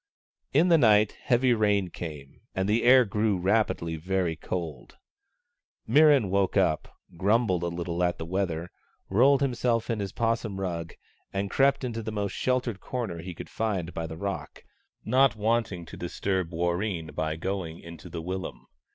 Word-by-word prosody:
In 160 +6 +4
the 165 -2 +6
night, 105 -4 +5
heavy 125 -1 +2
rain 105 -5 +1
came, 75 -5 -8
and 95 0 0
the 110 +3 +2
air 125 0 +7
grew 105 -1 +1
rapidly 95 -4 0
very 90 0 -1
cold. 80 -5 -6 0.9
Mirran 140 -4 +5
woke 100 0 +1
up, 90 -5 +2 0.3
grumbled 100 -1 +2
a 85 - -1
little 85 0 -2
at 90 0 +1
the 80 - -5
weather, 90 -1 -2 0.4
rolled 130 +7 +4
himself 120 -3 0
in 115 - -1
his 100 -1 -3
'possum 115 -3 -1
rug 85 -3 -4 0.4
and 100 0 -2
crept 140 0 +3
into 115 -2 -3
the 110 0 -5
most 105 -2 -2
sheltered 125 -5 -1
corner 115 -9 -4
he 90 +1 -7
could - - -8
find 95 -6 -2
by 80 0 -3
the 80 0 -7
rock, 100 +3 -5 0.4
not 130 +3 +4
liking 110 -5 0
to - - -10
disturb 95 0 -2
Warreen 85 -1 -2
by 80 +1 -2
going 85 -1 -4
into 85 +2 -11
the 85 -1 -6
willum. 95 +2 -5
95 Hz, 160 wpm, -27 LUFS, 85-115 Hz, 0.9 s, air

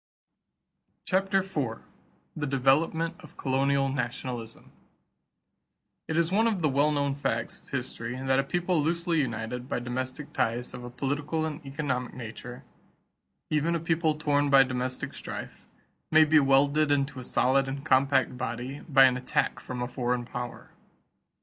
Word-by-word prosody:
CHAPTER 195 +1 +2
IV 140 -12 -3 0.5
THE 145 -2 -2
DEVELOPMENT 155 +5 +1
OF - - -15
COLONIAL 135 +1 +1
NATIONALISM 125 -2 -4 1.4
It 160 - -1
is 170 +1 +2
one 220 +4 +3
of 200 -7 -1
the 155 - +4
well 140 +3 +3
known 140 -1 +1
facts 140 - -2
of - - -24
history 115 +2 -4
that 130 0 +2
a - - +3
people 175 +3 0
loosely 170 +1 +1
united 125 0 -4
by - - 0
domestic 130 +3 -4
ties 120 +2 -1
of 125 -1 -7
a 120 - -6
political 145 +5 -2
and 155 0 -5
economic 135 -3 -3
nature, 125 +1 -8 0.9
even 155 +3 +2
a - - 0
people 165 -1 +1
torn 145 -2 +1
by 135 -1 +8
domestic 130 0 -3
strife, - - -8 0.4
may 155 0 +7
be 155 +1 +5
welded 140 +2 +3
into 140 -1 0
a - - -7
solid 135 +2 +2
and 135 +1 -5
compact 135 -1 +3
body 125 +2 -4
by 135 -2 +7
an 125 -1 +3
attack 125 - 0
from 125 -1 -5
a - - -2
foreign 125 -1 -1
power. 120 0 -7
135 Hz, 150 wpm, -28 LUFS, 125-155 Hz, 1.4 s, by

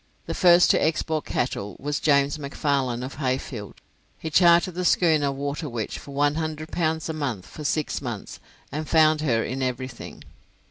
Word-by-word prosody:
The - - -4
first 175 -1 +6
to - - +2
export 160 -1 0
cattle 105 -5 -2
was 145 +1 -2
James 140 0 +2
McFarlane 140 -3 -1
of 135 - -8
Heyfield. 130 -6 -3 0.4
He 160 - -6
chartered 175 +2 +5
the 180 +2 -3
schooner 155 -5 +3
'Waterwitch' 140 -4 -4
for - - -13
100 155 +2 -1
pounds 160 -2 -1
a 160 - -3
month 130 -11 -3
for 155 - -10
six 150 +1 -1
months, 120 -6 -6 0.3
and 155 +2 -4
found 155 -1 +4
her 120 -7 +1
in 135 +1 -4
everything. 130 -1 -5
145 Hz, 155 wpm, -25 LUFS, 130-155 Hz, 0.4 s, first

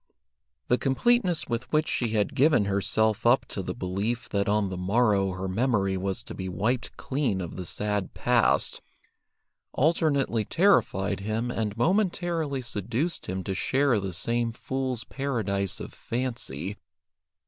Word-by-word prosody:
The 125 - +3
completeness 180 - +2
with 120 +1 -3
which 155 0 +2
she 120 - 0
had 105 -2 +1
given 135 -6 +4
herself 100 +2 +1
up 120 +3 +4
to 95 - -4
the - - -4
belief 105 +4 -2
that 100 0 0
on 105 -1 +2
the 95 - -4
morrow 100 0 +2
her 95 +1 -4
memory 100 -1 +1
was 95 0 -2
to - - -8
be 95 -1 -5
wiped 110 +8 -1
clean 130 -8 -1
of 85 -3 -5
the 90 -2 -5
sad 105 0 -1
past, 120 -2 +2 0.9
alternately 140 -6 +2
terrified 100 - +2
him 110 +4 -2
and 110 -3 -2
momentarily 170 - 0
seduced 120 - -2
him 95 +1 -3
to 95 - -2
share 135 +4 +2
the 95 -1 -3
same 115 +7 -1
fool's 130 0 -3
paradise 105 -10 -2
of - - -7
fancy. 115 - -4
115 Hz, 145 wpm, -27 LUFS, 100-130 Hz, 0.9 s, given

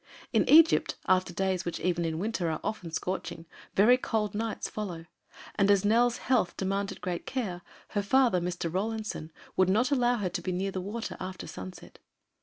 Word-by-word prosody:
In - - +3
Egypt, 325 +2 +6
after 185 -1 +3
days 185 0 -1
which 170 -1 -4
even 175 -1 0
in 160 -1 -2
winter 190 -2 -1
are 155 - -2
often 200 -6 -3
scorching, 165 0 -4 0.3
very 230 +6 +6
cold 220 -4 -1
nights 220 +1 -2
follow, 180 -6 -5 0.5
and 200 0 +2
as 200 0 +4
Nell's 235 +3 +3
health 250 -8 +1
demanded 195 +1 -2
great 175 -2 -4
care, 210 -10 -3 0.3
her 205 - 0
father, 230 -3 +3
Mr. 175 -1 -3
Rawlinson, 215 -4 -3 0.2
would 185 -1 +3
not 245 +8 +2
allow 245 -3 +3
her 200 -4 -1
to 175 - -4
be 185 - -2
near 190 +2 -1
the 185 - -3
water 215 +5 -5
after 185 0 -6
sunset. 95 0 -9
195 Hz, 180 wpm, -29 LUFS, 180-220 Hz, 0.5 s, Egypt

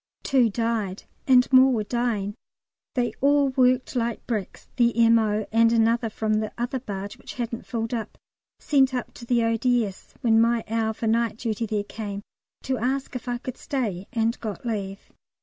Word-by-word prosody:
Two 255 -4 +3
died, 220 -3 -2 0.2
and 255 -1 +6
more 260 +1 +7
were 225 -4 0
dying. 220 -3 -1 0.6
They 245 -2 0
all 285 0 +4
worked 255 0 +2
like 235 -2 -2
bricks. 215 -6 -4
The 235 -1 +3
M.O., 215 -2 +3
and 230 +1 +4
another 230 0 +2
from 215 0 -1
the 215 -1 -3
other 245 +2 -2
barge 200 -4 -6
which - - -10
hadn't 235 -1 -4
filled 230 -1 -3
up, 225 -2 -4 0.4
sent 270 -3 +3
up 250 - -4
to 235 - -11
the 240 -1 +2
O.D.S., 230 -3 0
when 225 -2 +4
my 230 0 +2
hour 220 0 0
for 225 - -5
night 225 0 +1
duty 225 -1 -2
there 210 -1 -1
came, 205 -1 -6 0.4
to 260 -1 -1
ask 265 +3 -2
if 250 0 -6
I 245 0 -1
could 255 0 -7
stay, 210 -9 -3
and 230 -1 0
got 215 0 -6
leave. 200 -4 -4
230 Hz, 175 wpm, -25 LUFS, 220-245 Hz, 0.6 s, more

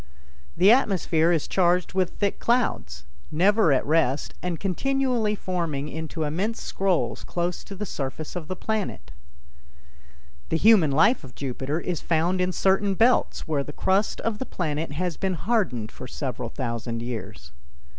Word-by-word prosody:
The 195 +3 +7
atmosphere 180 -9 +3
is 165 -4 +1
charged 180 -1 +2
with 185 -2 +1
thick 200 -1 0
clouds, 75 - 0 0.3
never 190 +3 +4
at 135 - +2
rest 150 -3 +1
and 175 -3 -3
continually 240 +2 0
forming 165 -7 -3
into 160 +1 -4
immense 185 +10 -1
scrolls 165 - -1
close 175 0 -2
to 200 - -8
the 210 +2 -4
surface 145 -1 -5
of 170 -3 -5
the 185 - -3
planet. 220 0 -3 1.4
The 160 - +1
human 205 -4 +6
life 185 - +3
of 125 -3 -12
Jupiter 135 +3 -3
is 175 -2 -3
found 170 +3 +1
in 180 0 +1
certain 195 +2 +2
belts 240 +5 +2
where 150 -3 0
the 150 - -9
crust 195 +6 +1
of 220 -2 -2
the 260 - -3
planet 155 -3 -2
has 175 +2 -2
been 190 -2 -1
hardened 155 - -1
for 130 - -9
several 125 -3 -4
thousand 115 -2 -4
years. 105 - -6
175 Hz, 155 wpm, -25 LUFS, 145-195 Hz, 1.4 s, The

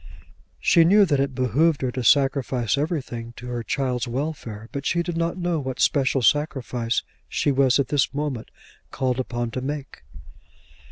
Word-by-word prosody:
She 170 - +5
knew 200 +5 +6
that 145 -6 +1
it 135 -1 -1
behoved 135 +5 +2
her 130 - 0
to 130 0 -4
sacrifice 135 -2 +2
everything 135 -6 -3
to 120 - -11
her 120 -1 -3
child's 125 +1 -1
welfare, 120 -5 -4
but 140 -1 -4
she 170 +4 +1
did 175 -1 -4
not 170 +1 -1
know 175 -2 -1
what 130 -2 -5
special 135 -2 +2
sacrifice 125 -3 +1 0.3
she 145 - +1
was 135 -1 +3
at 140 -3 0
this 145 -3 +1
moment 140 -5 -3 0.4
called 130 -1 -1
upon 120 -2 -3
to 130 - -4
make. 140 +1 -5
135 Hz, 165 wpm, -24 LUFS, 125-150 Hz, 0.4 s, knew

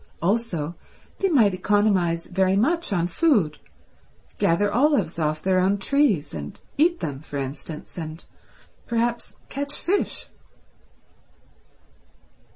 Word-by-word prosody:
Also 175 -5 0 0.5
they 390 - +2
might 230 - +4
economise 185 -3 +2
very 190 +1 +1
much 330 - +1
on 175 -4 +1
food—gather 170 - -1
olives 240 - +2
off 155 0 -1
their 185 -1 +3
own 190 +2 +2
trees 205 - +1
and 75 -2 -7 0.2
eat 340 +4 +2
them, 140 -3 -3
for 145 -1 -7
instance, 145 +5 -6
and 160 0 -7 0.6
perhaps 235 0 -1
catch 285 +1 -3
fish. 395 +4 -1
190 Hz, 105 wpm, -24 LUFS, 160-240 Hz, 0.6 s, might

